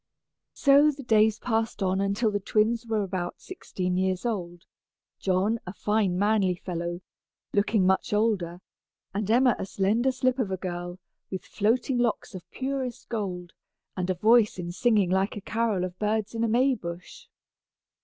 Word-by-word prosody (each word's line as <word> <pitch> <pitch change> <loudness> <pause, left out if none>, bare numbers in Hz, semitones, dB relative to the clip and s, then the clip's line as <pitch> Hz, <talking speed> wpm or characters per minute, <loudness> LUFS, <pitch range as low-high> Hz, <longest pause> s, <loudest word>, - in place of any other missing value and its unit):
So 280 +2 +5
the 280 -1 -5
days 220 -2 +3
passed 225 -3 -1
on 190 +1 +1
until 200 +3 +1
the 205 - -1
twins 225 +4 +1
were 220 -2 0
about 185 -2 -4
sixteen 185 - -4
years 185 +2 0
old, 175 -6 -3 0.5
John 195 +4 +1
a 180 - -5
fine 205 -4 0
manly 200 -2 +2
fellow, 175 0 -4 0.5
looking 205 -1 +2
much 190 0 +1
older, 200 -5 0 0.5
and 205 +1 -2
Emma 245 +1 +4
a - - -2
slender 215 +7 +1
slip 255 0 0
of 225 -6 0
a 190 - -2
girl, 175 -1 -5 0.3
with 190 - -5
floating 245 +4 0
locks 235 -3 -1
of 185 -3 -10
purest 265 -2 -4
gold, 180 -6 -4 0.4
and 180 0 -2
a 185 - +1
voice 220 +3 +4
in 175 -1 -4
singing 205 -1 +2
like 190 +3 +1
a - - -6
carol 215 -2 0
of 185 0 -5
birds 215 0 -1
in 230 0 -1
a - - +2
Maybush. 215 -8 -1
205 Hz, 160 wpm, -27 LUFS, 185-230 Hz, 0.5 s, So